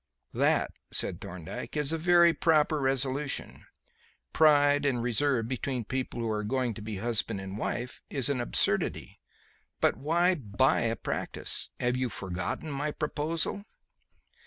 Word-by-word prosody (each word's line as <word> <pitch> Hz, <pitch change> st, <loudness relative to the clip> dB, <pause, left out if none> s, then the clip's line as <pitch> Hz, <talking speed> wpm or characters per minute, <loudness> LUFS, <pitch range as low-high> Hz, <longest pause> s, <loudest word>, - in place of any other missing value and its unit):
"That," -, -, +2 dB, 0.2 s
said -, -, -2 dB
Thorndyke, 90 Hz, -, -7 dB
"is 150 Hz, 0 st, 0 dB
a 165 Hz, -, 0 dB
very 170 Hz, 0 st, +5 dB
proper 155 Hz, -2 st, +3 dB
resolution. 135 Hz, +1 st, -1 dB, 0.7 s
Pride 145 Hz, -2 st, +5 dB
and 130 Hz, -4 st, +1 dB
reserve 125 Hz, -1 st, +1 dB
between 130 Hz, -1 st, -2 dB
people 130 Hz, 0 st, -3 dB
who 115 Hz, -, -1 dB
are 105 Hz, 0 st, -1 dB
going 125 Hz, +1 st, 0 dB
to 105 Hz, -, -9 dB
be 105 Hz, -1 st, -5 dB
husband 110 Hz, -1 st, 0 dB
and 95 Hz, 0 st, -6 dB
wife, 120 Hz, +3 st, -4 dB
is 135 Hz, -4 st, 0 dB
an 140 Hz, -3 st, +1 dB
absurdity. 120 Hz, -, 0 dB, 0.6 s
But -, -, +2 dB
why 170 Hz, +5 st, +2 dB
buy 130 Hz, -, +1 dB
a 115 Hz, 0 st, 0 dB
practice? -, -, -3 dB
Have 125 Hz, 0 st, +1 dB
you 130 Hz, -1 st, 0 dB
forgotten 95 Hz, -, -3 dB
my 145 Hz, +2 st, -2 dB
proposal?" 155 Hz, +6 st, -2 dB
130 Hz, 140 wpm, -29 LUFS, 115-150 Hz, 0.7 s, very